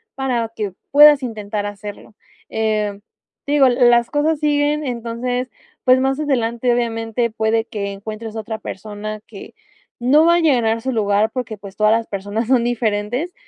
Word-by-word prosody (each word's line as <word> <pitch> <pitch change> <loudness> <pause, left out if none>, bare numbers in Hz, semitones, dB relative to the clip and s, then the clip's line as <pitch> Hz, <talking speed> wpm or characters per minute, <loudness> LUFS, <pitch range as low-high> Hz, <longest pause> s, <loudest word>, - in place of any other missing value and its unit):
para 245 -4 -1
que 205 -4 -3 0.2
puedas 290 -1 +7
intentar 210 -3 -4
hacerlo. 205 +1 -8 0.4
Eh, 215 -2 -1 0.5
te 285 - -1
digo, 280 -2 +6
las 240 -1 +4
cosas 300 +1 +1
siguen, 295 0 +1
entonces, 245 +1 -3 0.4
pues 255 0 +5
más 270 +2 0
adelante, 245 -4 0
obviamente, 230 0 -1
puede 220 0 0
que 200 -3 -4
encuentres 215 +2 -7
a - - -3
otra 220 +1 -5
persona 215 +1 -7
que 200 - -11 0.5
no 280 +6 +4
va 340 0 +5
a - - +3
llenar 235 -8 +2
su 260 - -2
lugar 210 -1 +1
porque, 245 -4 -5
pues, 200 -1 -11
todas 215 0 +4
las 230 0 +1
personas 205 +3 -3
son 250 -2 +3
diferentes, 240 +6 -1
230 Hz, 160 wpm, -19 LUFS, 215-260 Hz, 0.5 s, puedas